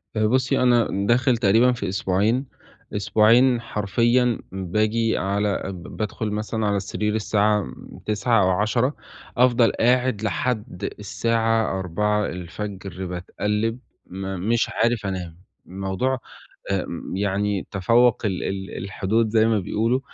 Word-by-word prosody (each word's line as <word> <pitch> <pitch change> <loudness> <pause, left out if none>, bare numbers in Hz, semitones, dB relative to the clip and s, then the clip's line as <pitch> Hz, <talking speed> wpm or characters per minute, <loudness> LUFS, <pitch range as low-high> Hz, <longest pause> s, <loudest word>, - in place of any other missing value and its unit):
آآ 110 0 +2
بُصّي، 130 +3 +2
أنا 120 -2 +4 0.2
داخل 125 +2 +3
تقريبًا 115 +3 +4
في 115 -5 -3
أسبوعين، 100 +7 +1 0.5
أسبوعين 115 +4 +4
حرفيًا 115 +3 +1
بآجي 110 +5 0
على 100 +1 0
ب 85 - -10
بادخُل 110 0 -3
مثلًا 110 +1 -2
على 100 0 +1
السرير 105 +2 -2
الساعة 105 -1 +2
م 65 -7 -11
21:00 110 +1 +2
أو 95 - +3
22:00، 110 +8 +1 0.4
أفضل 120 -1 +4
قاعد 125 -2 +2
لحد 110 0 -2 0.2
الساعة 115 0 0
04:00 95 0 -3
باتقلِّب 105 +6 -2 0.3
م 95 +1 -5
مش 120 0 +2
عارف 115 -2 0
أنام. 90 -2 -5 0.2
الموضوع 95 +8 -2 0.5
آمم 95 -1 -3
يعني 100 0 -1
تفوَّق 115 +5 +3
ال 95 -4 -1
ال 95 0 -4
الحدود 105 +3 0
زي 110 0 +3
ما 110 -2 +2
بيقولوا. 115 +6 0
105 Hz, 120 wpm, -23 LUFS, 95-115 Hz, 0.5 s, أنا